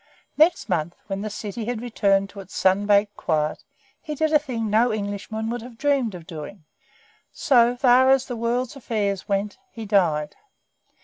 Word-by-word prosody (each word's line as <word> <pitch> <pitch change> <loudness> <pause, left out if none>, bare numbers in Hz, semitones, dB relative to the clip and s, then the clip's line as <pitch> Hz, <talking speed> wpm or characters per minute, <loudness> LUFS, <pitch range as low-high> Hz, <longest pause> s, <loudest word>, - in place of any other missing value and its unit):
Next 325 +3 +3
month, 175 -3 -1
when 195 0 -4
the 215 - -3
city 210 +2 -6
had 240 -1 -3
returned 200 -4 +1
to 200 - -11
its 195 -1 -11
sun 190 +2 +2
baked 205 0 +3
quiet, 155 -2 -1 0.4
he 305 -2 -5
did 315 +1 0
a 300 - +6
thing 245 -6 -4
no 225 +3 +3
Englishman 215 +2 -4
would 240 0 -4
have 235 0 -11
dreamed 270 -7 +1
of 170 -2 -10
doing; 160 +3 -9 0.7
for, - - -25
so 240 -2 +4
far 255 +1 +5
as 265 -1 +4
the 245 - -5
world's 235 +2 -2
affairs 210 -7 -2
went, 200 - -1
he 225 -1 -8
died. 170 -8 +1
215 Hz, 180 wpm, -23 LUFS, 195-245 Hz, 0.7 s, a